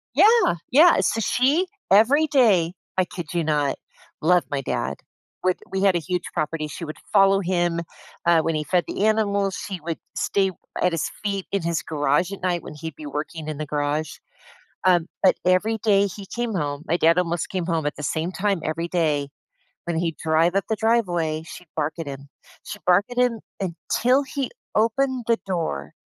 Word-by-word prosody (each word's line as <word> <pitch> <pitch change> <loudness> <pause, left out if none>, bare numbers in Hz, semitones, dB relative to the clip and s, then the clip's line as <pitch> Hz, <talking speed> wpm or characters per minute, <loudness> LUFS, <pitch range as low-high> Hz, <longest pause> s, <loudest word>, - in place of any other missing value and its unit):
Yeah, 420 - +5 0.2
yeah. 320 +7 +7
So 225 - +1
she- 280 - +2 0.2
every 260 +10 +5
day, 205 - +3 0.2
I 185 - +3
kid 175 -3 -7
you 170 -1 +1
not, 150 -2 +1 0.5
love 175 +2 +4
my 140 -1 -1
dad- 70 - -2 0.5
would 185 -1 +2
we 190 - -1
had 195 -2 +4
a 175 - +2
huge 180 +1 -2
property- 155 -1 -2
she 150 +3 -8
would 155 - -7 0.2
follow 195 -1 +5
him, 175 -2 0 0.4
uh, 170 -1 +5
when 160 0 -1
he 155 - -1
fed 180 +2 +2
the 205 - -1
animals, 200 -3 +1
she 195 -3 -5
would 165 +1 -4 0.2
stay 195 -1 +1 0.3
at 180 - +3
his 165 - -1 0.2
feet 200 -2 -2
in 200 -2 0
his 170 -1 0
garage 155 +4 +1
at 200 - -7
night 175 -2 -1
when - - -8
he'd 160 0 -7
be 150 - -10
working 155 +2 -5
in 150 - -4
the 155 - -2
garage. 150 +1 -1 0.7
Um, 175 -3 +4 0.2
but 190 - +5
every 185 +5 +3
day 200 -2 +3
he 195 +1 -9
came 235 +1 -3
home- 145 -3 -2
my 170 - +3
dad 165 +2 +4
almost 170 -1 -1
came 185 -3 -2
home 165 -3 0
at 150 - -2
the - - -7
same 160 +5 -1
time 195 -1 0
every 165 +2 -2
day- 155 -5 0 0.6
when 170 -1 -1
he'd 165 -2 -2
drive 160 +2 +2
up 195 - +2
the 220 - 0
driveway, 175 -9 +1
she'd 175 +1 -11
bark 155 0 -1
at 165 - -4
him. 140 0 -8 0.4
She'd 210 - -8
bark 180 +3 +4
at 245 - -6
him 245 -3 +2 0.2
until 235 +8 +1
he 270 -1 -3 0.3
opened 250 +3 +1
the 230 -1 +2
door, 160 - -3
175 Hz, 195 wpm, -23 LUFS, 160-205 Hz, 0.7 s, yeah